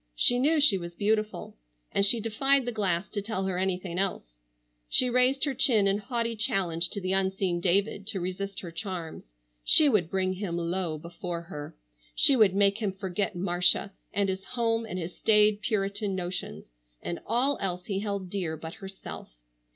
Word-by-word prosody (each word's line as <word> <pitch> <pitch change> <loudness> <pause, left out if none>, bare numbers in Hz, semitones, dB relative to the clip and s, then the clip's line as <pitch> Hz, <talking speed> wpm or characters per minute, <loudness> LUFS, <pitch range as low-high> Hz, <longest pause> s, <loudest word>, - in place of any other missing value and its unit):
She 245 - +3
knew 305 +4 +3
she 250 -10 +4
was 170 0 -8
beautiful, 215 +2 -1 0.4
and 200 - +1
she 215 +4 +4
defied 265 +5 +2
the 245 - -2
glass 195 -5 -1
to 205 - -3
tell 200 -2 -3
her 185 -1 -2
anything 185 -1 -2
else. - - -2 0.5
She 250 -1 +3
raised 250 +2 +3
her 280 - -1
chin 240 -5 +4
in 195 +1 +2
haughty 230 +1 -2
challenge 185 -7 +1
to 200 - -4
the 185 0 -2
unseen 190 -2 0
David 200 +2 +1
to 210 -3 -2
resist 190 +2 -4
her 175 - -8
charms. 170 - -6 0.4
She 310 - +6
would 210 - +2
bring 185 0 0
him 185 -3 -4
low 170 -1 -2
before 170 +1 -6
her. 150 -4 -8 0.4
She 275 - +6
would 210 -6 +4
make 200 +1 +3
him 205 -4 -2
forget 195 +1 -3
Marcia, 180 +2 +2 0.2
and 200 -1 0
his 190 0 -3
home 230 -1 -1
and 185 - -5
his 175 0 -6
staid 210 -1 +4
Puritan 200 -2 -1
notions, 175 - -5 0.3
and 170 - -4
all 255 +5 +2
else 180 -2 -3
he 195 -3 -2
held 200 -3 -4
dear 175 -6 -2
but 160 +1 -8
herself. 195 - -10
195 Hz, 180 wpm, -27 LUFS, 180-220 Hz, 0.5 s, She